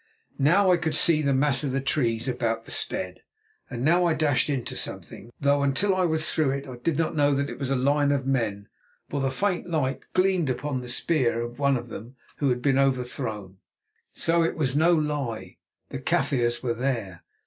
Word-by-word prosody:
Now 180 +7 +4
I 180 - +4
could 160 -3 -2
see 155 -1 +4
the 140 -2 +1
mass 135 0 +2
of 140 - -1
the 135 - +1
trees 120 -4 0
about 115 -3 -1
the - - -8
stead. - - -3 0.5
And 125 0 -4
now 175 +3 +4
I 165 -2 +2
dashed 150 -2 +1
into 135 -4 -2
something, 115 - -6
though 140 0 +2
until 140 +9 +2
I 185 -1 +2
was 160 -2 +1
through 155 -3 +2
it, 140 0 -5
I 125 -2 -8
did 145 +5 -1
not 165 0 0
know 145 -1 +3
that 140 +1 -1
it - - -9
was 135 -2 -3
a 135 - +1
line 145 +2 +2
of 140 -2 0
men, 110 -7 -1 0.4
for 145 - -1
the 135 - +1
faint 180 +6 -1
light 135 -5 -1 0.2
gleamed 185 -5 +2
upon 130 +1 -2
the 125 - -8
spear 125 -3 +1
of 120 +2 -6
one 140 -2 +3
of 120 0 -8
them 115 +4 -9 0.2
who 140 - +1
had 125 -1 -1
been 135 -1 +3
overthrown! 125 -7 -2 0.5
So 170 +1 +1
it 165 - 0
was 135 -4 0
no 170 +3 +4
lie! 145 -7 -3 0.3
The - - -5
Kaffirs 120 -2 0
were 120 -2 0
there! 115 -7 -3
135 Hz, 205 wpm, -25 LUFS, 125-155 Hz, 0.5 s, Now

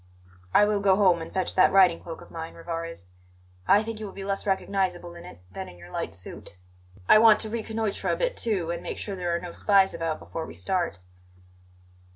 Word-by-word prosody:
"I 205 - +6
will 210 -1 +1
go 195 -1 +4
home 185 -4 +4
and 165 - -7
fetch 185 -1 -1
that 185 - +5
riding 185 -3 +5
cloak 165 -1 -8
of - - -14
mine, 165 0 -7
Rivarez. 165 - -6 0.6
I 205 +2 +5
think 225 -1 -6
you 215 - -5
will 195 - -10
be 195 - -7
less 195 +1 -3
recognizable 190 -3 -1
in 170 - -11
it 90 0 -12
than - - -7
in 90 - -14
your 85 0 -13
light 85 - -4
suit. 90 0 -9 0.5
I 215 - +8
want 220 -1 +7
to 220 - -4
reconnoitre 220 -2 -2
a - - +2
bit, - - -1
too, 190 -7 -1
and 170 - -4
make - - -5
sure 200 - -4
there 175 -2 -1
are - - -1
no 175 0 -7
spies 195 +1 +3
about 165 -1 -2
before 160 -1 -6
we - - -10
start." 180 - -1
185 Hz, 215 wpm, -26 LUFS, 165-205 Hz, 0.6 s, I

